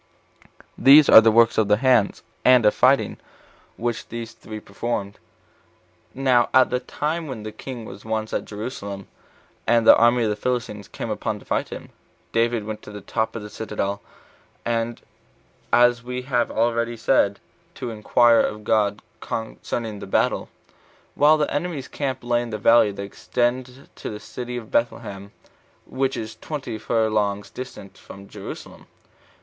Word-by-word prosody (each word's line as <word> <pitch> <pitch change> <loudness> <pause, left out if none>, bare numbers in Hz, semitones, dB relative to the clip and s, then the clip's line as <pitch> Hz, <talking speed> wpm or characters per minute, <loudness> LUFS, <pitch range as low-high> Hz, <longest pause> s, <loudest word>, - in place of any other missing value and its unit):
These 140 +2 +8
are 110 - +11
the 115 - +5
works 115 0 +4
of 110 - +2
the 105 0 +4
hands, 125 -4 +2 0.2
and 125 -3 +6
of 105 - +5
fighting, 135 +2 +3 0.6
which 120 -1 -3
these 115 0 -6
three 110 0 -9
performed. 100 -1 -4 1.0
Now 130 -3 +3
at 130 0 +5
the 125 - +1
time 155 +5 -3
when 125 -6 -6
the 110 - -6
king 120 0 -8
was 100 - -10
once 110 0 -3
at - - -1
Jerusalem, 100 -3 -6 0.6
and 115 +1 +3
the - - +9
army 120 +1 +4
of 110 - +1
the - - -1
Philistines 105 -3 -3
came - - -6
upon - - -2
him - - -10
to - - -17
fight - - -1
him, - - -8 0.4
David 115 -1 +1
went 110 0 -5
up - - -36
to - - -9
the 105 -1 -8
top 110 +4 -2
of 115 - -5
the 105 - -8
citadel, 100 -2 -3 1.7
as 120 -1 +4
we 125 +1 -5
have 125 -2 0
already 115 +1 0
said, 105 -4 +2 0.4
to 125 -3 -5
inquire 115 +2 +4
of 105 0 -3
God 105 -2 +1 0.2
concerning 110 -1 -5
the - - -8
battle, - - 0 0.6
while 150 +2 +5
the 150 - -1
enemy's 145 -3 -3
camp 130 -3 -4
lay 120 0 +1
in 120 - -6
the 110 - -4
valley 110 0 +5
that 100 0 -6
extends 120 +5 -1 0.3
to - - -6
the 105 - -7
city 125 +1 -6
Bethlehem, 110 -3 -3 0.5
which 135 0 -2
is 110 -1 -6
twenty 130 -4 -6
furlongs 105 -3 0
distant 125 -6 -9
from 100 0 -12
Jerusalem. - - -10
115 Hz, 160 wpm, -23 LUFS, 105-125 Hz, 1.7 s, are